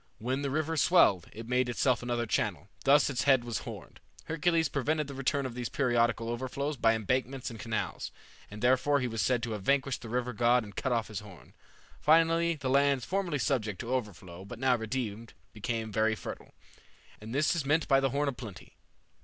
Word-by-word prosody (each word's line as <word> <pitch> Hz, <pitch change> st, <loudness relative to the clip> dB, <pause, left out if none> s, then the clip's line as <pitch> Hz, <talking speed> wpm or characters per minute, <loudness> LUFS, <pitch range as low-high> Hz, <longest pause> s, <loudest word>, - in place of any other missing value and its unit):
When 130 Hz, +5 st, -2 dB
the 140 Hz, -, -1 dB
river 155 Hz, +3 st, -1 dB
swelled, 140 Hz, -, +4 dB
it 115 Hz, +1 st, -9 dB
made 125 Hz, 0 st, +1 dB
itself 125 Hz, 0 st, +1 dB
another 120 Hz, -1 st, -1 dB
channel. -, -, -1 dB, 0.2 s
Thus 140 Hz, +1 st, +6 dB
its 135 Hz, -2 st, -1 dB
head 135 Hz, -3 st, +5 dB
was 120 Hz, -3 st, -3 dB
horned. -, -, -9 dB, 0.3 s
Hercules 165 Hz, +1 st, +1 dB
prevented 150 Hz, +3 st, 0 dB
the 140 Hz, -, -8 dB
return 135 Hz, +1 st, -1 dB
of 130 Hz, -, -4 dB
these 120 Hz, -1 st, -4 dB
periodical 120 Hz, -3 st, +1 dB
overflows 130 Hz, +5 st, -3 dB
by 115 Hz, -3 st, +3 dB
embankments 125 Hz, +4 st, -2 dB
and 115 Hz, -, -9 dB
canals; 110 Hz, -3 st, -3 dB, 0.4 s
and 105 Hz, +2 st, -9 dB
therefore 130 Hz, +3 st, +3 dB
he 125 Hz, -, -1 dB
was 115 Hz, -2 st, -2 dB
said 125 Hz, -3 st, +1 dB
to 120 Hz, -, -2 dB
have 105 Hz, -2 st, -4 dB
vanquished 135 Hz, +3 st, +1 dB
the 115 Hz, -, -8 dB
river 125 Hz, +1 st, -1 dB
god 120 Hz, +2 st, +3 dB
and 100 Hz, -2 st, -11 dB
cut 130 Hz, -, -2 dB
off 115 Hz, -3 st, 0 dB
his 105 Hz, -3 st, -4 dB
horn. 105 Hz, -4 st, -14 dB, 0.5 s
Finally, 165 Hz, +1 st, +4 dB
the 140 Hz, -3 st, -5 dB
lands 140 Hz, -1 st, +3 dB
formerly 185 Hz, -5 st, -1 dB
subject 115 Hz, -8 st, -1 dB
to 120 Hz, +2 st, -3 dB
overflow, 95 Hz, -7 st, -4 dB
but 105 Hz, +4 st, -9 dB
now 130 Hz, +1 st, +3 dB
redeemed, 115 Hz, -1 st, -4 dB, 0.2 s
became 110 Hz, +1 st, -3 dB
very 110 Hz, +1 st, +2 dB
fertile, -, -, -9 dB, 0.6 s
and 110 Hz, +1 st, -9 dB
this 145 Hz, +6 st, +2 dB
is 165 Hz, -, -1 dB
meant 155 Hz, +3 st, +1 dB
by 135 Hz, -1 st, +5 dB
the 135 Hz, 0 st, +1 dB
horn 145 Hz, +3 st, 0 dB
of 140 Hz, -, -1 dB
plenty. 110 Hz, -7 st, -10 dB
125 Hz, 200 wpm, -30 LUFS, 115-140 Hz, 0.6 s, Thus